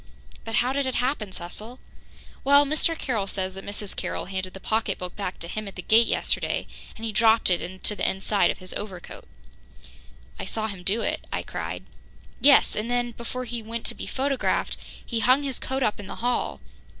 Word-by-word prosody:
"But 225 -1 -3
how 250 +2 +3
did 280 -1 +1
it 260 - -1
happen, 245 -5 0
Cecil?" 200 +7 -5 0.7
"Well, 285 +1 +7
Mr. 310 +3 +1
Carroll 220 -10 -1
says 190 -1 -2
that 195 0 -8
Mrs. 205 0 -3
Carroll - - -3
handed 185 0 -4
the - - -7
pocketbook 195 -4 -1
back 195 -3 -3
to 170 - -8
him 215 +4 -4
at 195 - -8
the 180 - -6
gate 225 +2 +6
yesterday, - - 0 0.3
and 225 - -5
he 225 - -1
dropped 220 -1 +5
it 175 - +3
in 185 +2 -6
the 210 - +1
inside 195 +2 +2
pocket - - +3
of - - -17
his 185 -1 -7
over 195 -4 -5
coat - - -11 0.6
" - - -23
"I - - -3
saw 220 -1 -2
him 195 -4 -6
do 205 +5 +1
it," - - -2
I - - -1
cried. - - -4 0.6
"Yes, 280 0 +6
and 215 +3 -2
then, 245 0 +1
before 235 +2 -5
he 235 -1 -4
went 230 +1 -5
to - - +1
be - - -7
photographed, 275 0 +1 0.3
he 230 - -1
hung 255 +5 +5
his 270 -3 0
coat 265 0 -1
up 210 - +1
in 200 - -7
the - - -6
hall. 245 +1 -1
220 Hz, 210 wpm, -26 LUFS, 190-245 Hz, 0.7 s, Well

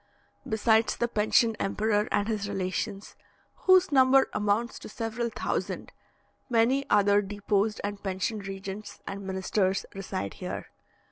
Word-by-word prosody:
Besides 220 +1 +2
the 235 - +1
pensioned 225 +1 +2
emperor 210 +1 +1
and 205 - +1
his 210 -3 -2
relations, 195 +1 -3 0.4
whose 370 -2 +4
number 265 -1 +5
amounts 210 +3 0
to - - -9
several 230 +2 -3
thousand, - - -3 0.6
many 245 +4 +2
other 205 0 +4
deposed 205 +1 -1
and 205 0 -4
pensioned 195 +2 -3
regents 195 +2 -7
and 195 0 -5
ministers 190 0 0
reside 180 - -4
here. - - -6
210 Hz, 125 wpm, -28 LUFS, 195-225 Hz, 0.6 s, number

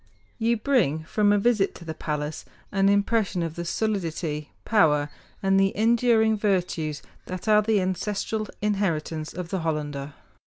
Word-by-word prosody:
You 230 +1 +2
bring 215 - +1
from 205 +5 +2
a 205 - +4
visit 205 -2 +2
to 170 - -11
the 160 - -4
palace 150 -1 -4 0.3
an 195 -1 +3
impression 200 -2 +1
of 165 -2 -3
the 170 - -5
solidity, 170 -6 -2
power, 150 -9 +3 0.3
and 195 0 +4
the 195 0 +2
enduring 225 0 +3
virtues 180 -7 -1 0.2
that 185 +3 -6
are 210 0 +6
the 215 -1 +2
ancestral 205 +3 -2 0.2
inheritance 165 -7 -1
of 180 -2 -6
the 190 - -1
Hollander. 150 -3 -3
195 Hz, 145 wpm, -25 LUFS, 160-215 Hz, 0.3 s, are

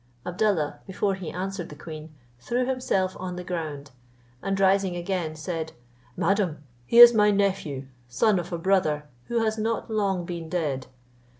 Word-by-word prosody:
Abdallah, 180 -4 0
before 195 +1 0
he 190 -4 -5
answered 185 -1 -4
the 150 - -9
queen, 155 0 -9 0.3
threw 245 - -1
himself 245 -8 0
on 180 -1 -4
the 180 - -6
ground, 155 -5 -5 0.5
and 195 0 -1
rising 195 -1 +3
again, 175 -3 -2
said, 160 0 -4 0.4
"Madam, 180 -5 0 0.2
he 235 - +2
is 240 0 +12
my 210 -2 +5
nephew, 195 -9 0 0.2
son 185 - +2
of 175 +1 -6
a 170 - -1
brother, 165 -4 +1 0.2
who 235 -1 0
has 220 0 0
not 225 +1 -2
long 195 -5 0
been 170 -2 -6
dead. 150 -7 -2
185 Hz, 160 wpm, -26 LUFS, 160-200 Hz, 0.5 s, is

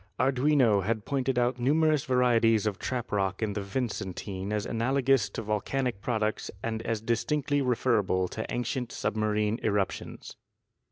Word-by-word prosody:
Arduino 130 -5 +3
had 110 +1 -1
pointed 135 -2 -1
out 125 +1 +1
numerous 150 +3 +2
varieties 115 -4 +3
of 105 -3 -1
trap 125 -2 -3
rock 95 0 0
in 105 -2 -1
the 100 - -3
Vicen 100 -3 -3
tine 95 0 -5
as 105 -1 -1
analogous 130 -1 +2
to 115 - -5
volcanic 110 +2 -1
products 110 -3 -1
and 110 -1 -2
as 115 -1 -2
distinctly 145 +5 0
referable 115 -7 +1
to 110 - -4
ancient 125 0 -2
submarine 105 +1 0
eruptions. 100 -3 -2
115 Hz, 145 wpm, -28 LUFS, 105-130 Hz, -, Arduino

